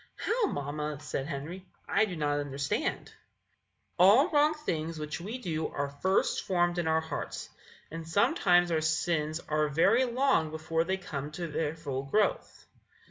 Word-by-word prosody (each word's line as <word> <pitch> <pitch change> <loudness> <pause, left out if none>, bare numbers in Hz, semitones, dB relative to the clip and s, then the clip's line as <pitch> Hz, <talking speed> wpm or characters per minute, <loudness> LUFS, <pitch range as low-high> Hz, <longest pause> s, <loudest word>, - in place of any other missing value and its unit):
"How, 450 -1 0
mamma?" 150 - -3
said 135 -2 -4
Henry. 160 +5 -6 0.2
"I 215 +2 +3
do 190 -4 -5
not 145 -2 0
understand." 140 -1 -2
Mrs. - - -14
Fairchild. - - -20 0.8
"All 215 - +7
wrong 300 0 +4
things 165 - -3
which 150 +2 -5
we 215 +8 -5
do 160 -10 -2
are 140 0 -3
first 185 +7 0
formed 175 -2 +1
in 170 - -1
our 160 0 +2
hearts; 160 -2 -5 0.4
and 165 0 -7
sometimes 175 - +3
our 160 -1 +1
sins 160 0 0
are 155 0 +1
very 195 - +3
long 245 - +2
before 160 +1 -1
they 190 +2 0
come 145 -6 -5
to 175 +2 -4
their 155 0 -2
full 140 -5 -4
growth. 215 - -1
160 Hz, 165 wpm, -30 LUFS, 150-190 Hz, 0.8 s, All